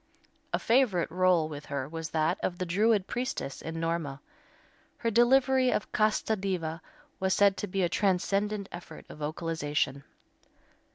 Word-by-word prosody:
A - - +2
favorite 225 -10 +2
rôle 180 -2 +3
with 150 -1 -8
her 140 -2 -3
was 160 +1 -5
that 160 +3 +1
of 175 - -2
the 185 - -2
Druid 205 +3 +2
priestess 245 - -4
in 165 0 -5
"Norma." 165 -4 -2 0.8
Her 230 - -1
delivery 255 +3 +4
of 210 - -1
"Casta 215 +1 +2
Diva" 180 -5 -3 0.4
was 190 0 +1
said 200 -1 +5
to 205 - -3
be 190 0 -1
a - - +3
transcendant 200 +2 0
effort 175 -2 -10
of - - -11
vocalization. 150 -3 -2
180 Hz, 150 wpm, -29 LUFS, 160-210 Hz, 0.8 s, said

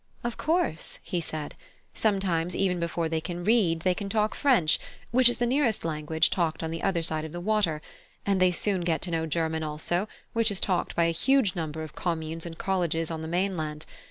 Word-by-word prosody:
"Of 240 -1 -2
course," 320 - 0
he 175 - -2
said; 155 -2 -5 0.4
"sometimes 185 -5 +1
even 185 -2 +1
before 170 0 -1
they 160 0 -1
can 175 +1 -5
read, 190 -6 +3
they 185 +2 +3
can 200 +2 -5
talk 215 +1 +1
French, 235 - +3 0.3
which 250 +1 +6
is 240 - -1
the 240 - +1
nearest 245 - +1
language 160 0 +1
talked 165 -3 0
on 160 - -2
the 165 - -4
other 180 -4 +1
side 155 -1 0
of 155 - -7
the 175 - -4
water; 175 -6 +1 0.4
and 195 -2 +2
they 185 - +6
soon 185 +1 0
get 165 -3 0
to 180 - -2
know 160 -1 0
German 160 0 0
also, 160 +5 -1 0.3
which 230 0 +3
is 200 -2 0
talked 180 -3 0
by 170 - +3
a 165 - +3
huge 230 +4 +2
number 160 -2 -3
of 155 - -8
communes 165 -1 -3
and 165 -1 -8
colleges 170 -4 0
on 160 -1 -4
the 160 - -5
mainland. 165 -4 -2
170 Hz, 210 wpm, -27 LUFS, 160-195 Hz, 0.4 s, which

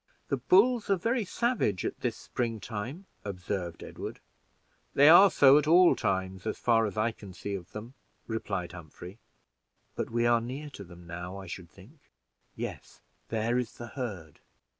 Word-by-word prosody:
"The 140 - +1
bulls 205 - +4
are 195 - +5
very 230 +6 0
savage 235 - 0
at - - -3
this - - -2
spring 115 -3 -3
time," 120 - -6 0.2
observed 90 -3 -4
Edward. - - -7 0.8
"They 140 +1 +7
are 190 +4 +9
so 140 -3 +7
at 150 - -3
all 175 +2 +7
times, 95 +1 -2
as - - -2
far 115 -2 +3
as 105 - -7
I 110 +2 +2
can 100 -4 -12
see 100 +3 -5
of 90 -3 -6
them," 110 +4 -8 0.3
replied 100 -6 -3
Humphrey; 90 +4 -11 0.8
"but - - -3
we 120 +1 +1
are 120 -1 +4
near 135 +5 -6
to 100 - -9
them 85 -1 -14
now, 90 +3 -6
I 95 - -8
should 85 -1 -8
think 110 - -17 0.6
yes, - - -7 0.3
there 115 +2 +1
is 120 -3 -4
the 120 0 -9
herd." 100 - -6
110 Hz, 170 wpm, -29 LUFS, 95-140 Hz, 0.8 s, are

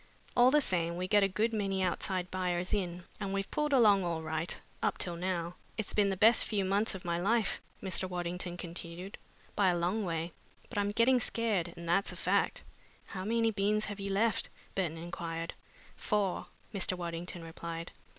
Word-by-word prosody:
All 245 +1 +7
the 300 +2 +5
same, 170 -7 0
we 180 +1 -2
get 205 +1 +5
a 195 - +5
good 215 +4 0
many 195 -3 0
outside 180 0 -1
buyers 180 -1 0
in, 180 -3 -1 0.2
and 200 -2 -2
we've 195 0 -2
pulled 300 0 0
along 210 -7 +6
all 165 -2 -1
right 160 +1 -2 0.2
up - - +1
till 175 -2 -1
now. 175 -1 -2 0.2
It's 220 - -3
been 205 -1 +4
the 190 - -1
best 225 +5 +6
few 200 -3 0
months 200 +2 +2
of 185 - -8
my 170 0 0
life," 220 +4 +1 0.2
Mr. 185 -1 0
Waddington 175 0 -3
continued, 175 +2 -7 0.4
"by 200 -2 +4
a 175 - +2
long 180 +6 +1
way, 165 -1 -2 0.4
but 215 - -2
I'm 205 0 +1
getting 235 +5 +4
scared, 210 -8 0
and 170 0 -7
that's 195 +4 +2
a - - -8
fact." - - +1 0.4
"How 185 -2 -5
many 225 +2 +2
beans 210 +1 +1
have 205 0 -5
you 200 0 -3
left?" 210 +1 +1 0.2
Burton 170 -4 -1
inquired. 165 0 -4 0.4
"Four," 205 -3 0 0.3
Mr. 190 -2 0
Waddington 170 0 -4
replied. 165 0 -6
185 Hz, 185 wpm, -32 LUFS, 175-205 Hz, 0.4 s, All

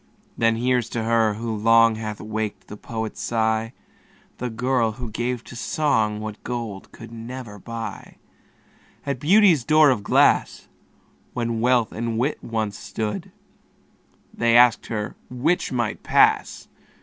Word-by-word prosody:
Then 115 0 +2
here's 120 0 0
to 115 - -1
her, 110 -2 +2
who 115 0 -4
long 115 +1 +5
Hath 110 -1 -5
waked 110 -1 -5
the - - -7
poet's 110 +1 -6
sigh, 110 0 0 0.7
The 125 - -3
girl 120 -1 0
who 120 -1 -7
gave 120 +2 -3
to - - -12
song 110 -6 0
What 105 -1 -7
gold 115 -5 -5
could 115 0 -12
never 115 -2 -8
buy. 115 +3 -7 0.9
At 140 -3 -2
Beauty's 180 - +5
door 155 0 +5
of 120 -5 -1
glass, 100 - +2 0.7
When 115 -2 -2
Wealth 120 -2 +2
and 115 0 -3
Wit 135 +6 -1
once 110 -3 -3
stood, 105 +1 -5 1.0
They 120 0 +3
asked 120 -1 +5
her 105 -1 -4
'which 130 +9 0
might 120 -4 -2
pass?" - - +2
115 Hz, 135 wpm, -23 LUFS, 110-125 Hz, 1.0 s, long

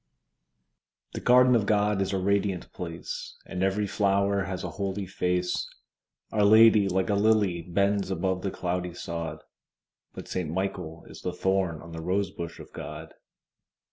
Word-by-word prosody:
The - - -4
garden 125 0 +6
of 105 -4 +1
God 105 -1 +2
is 95 - 0
a 95 - 0
radiant 100 -1 0
place, 85 -1 -6
And 90 - -5
every 95 +2 +1
flower 100 0 +1
has 95 -1 -4
a 90 - -4
holy 100 +1 -3
face: 90 -1 -1 0.6
Our 105 -2 +2
Lady 110 -1 +7
like 95 +2 0
a - - +3
lily 100 -4 +3
bends 100 +3 0
above 95 0 -1
the 100 - -1
cloudy 90 -1 -3
sod, 80 -3 -5 0.7
But - - -8
Saint 90 -4 -3
Michael 90 -2 -4
is - - -11
the - - -2
thorn 95 -4 0
on 85 - -11
the 80 0 -6
rosebush 90 -2 -2
of - - -12
God. 75 +1 -8
95 Hz, 155 wpm, -27 LUFS, 90-100 Hz, 0.7 s, Lady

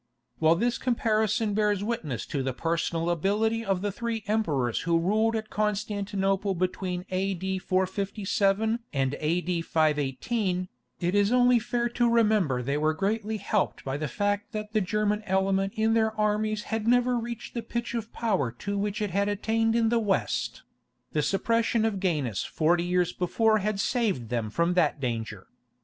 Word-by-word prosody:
While 160 +1 +5
this 235 +6 0
comparison 220 -3 +1
bears 205 -1 +1
witness 165 - -3
to 140 - -3
the 130 -1 -2
personal 165 +3 -1
ability 215 +6 +1
of 195 -3 -1
the 205 - 0
three 230 +1 -3
emperors 155 - 0
who 170 0 +1
ruled 215 +6 +2
at 220 0 -4
Constantinople 200 -2 -1
between 180 0 -2
A.D. 190 0 -1
457 195 +3 0
and 135 0 0
A.D. 170 +2 0
518, 165 - 0 0.3
it 175 +1 0
is 205 +1 +3
only 250 -1 +5
fair 240 +1 -1
to 240 0 +2
remember 210 - +2
they 140 +4 -1
were 155 +1 +1
greatly 215 +4 -1
helped 205 0 -1
by 135 0 -2
the 150 +1 -2
fact 205 - -1
that 215 0 -5
the 215 - +2
German 210 +2 0
element 195 +1 +1
in 220 +1 +2
their 220 -1 +1
armies 210 0 +1
had 225 0 -3
never 245 +1 +3
reached 235 0 -6
the 235 - -2
pitch 235 +1 -4
of 230 -2 -4
power 190 - 0
to 200 +11 -3
which 210 +2 -1
it 205 - -2
had 200 +3 +1
attained 225 +2 +1
in 230 -1 +3
the 235 0 +2
West; 195 - -1 0.5
the 150 - +1
suppression 230 - +1
of 210 -3 -1
Gainas 150 - -1
forty 170 +2 +1
years 180 0 +1
before 215 +4 +2
had 210 0 -1
saved 200 - 0
them 115 -3 -1
from 170 +10 +1
that 160 -4 +2
danger. 115 -6 -3
200 Hz, 165 wpm, -27 LUFS, 170-220 Hz, 0.5 s, While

